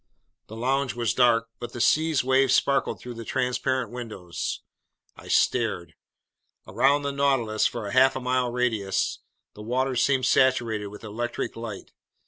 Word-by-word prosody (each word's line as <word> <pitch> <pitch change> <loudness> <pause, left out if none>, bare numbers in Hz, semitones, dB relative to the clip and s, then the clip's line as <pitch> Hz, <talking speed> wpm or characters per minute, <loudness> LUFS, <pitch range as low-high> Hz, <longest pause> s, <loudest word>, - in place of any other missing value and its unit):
The 110 - -10
lounge 130 +3 -1
was 120 -2 0
dark, 115 -2 +3
but 120 0 -7
the 120 - -6
sea's 155 +3 +2
waves 130 0 +3
sparkled 140 -1 +1
through 125 - -8
the 115 0 -8
transparent 130 +1 -1
windows. 110 -8 -5 0.5
I - - -14
stared. 85 -2 +1 0.7
Around 140 +4 +2
the 140 - -1
Nautilus 135 -6 +1
for 115 -3 -6
a 100 - -5
half 130 +1 +4
mile 125 -1 0
radius, 115 -6 -1 0.3
the 105 - -11
waters 125 +3 0
seemed 130 -1 +2
saturated 115 -5 +2
with 105 +2 -11
electric 115 +3 -4
light. 115 -3 -8
125 Hz, 145 wpm, -25 LUFS, 115-130 Hz, 0.7 s, half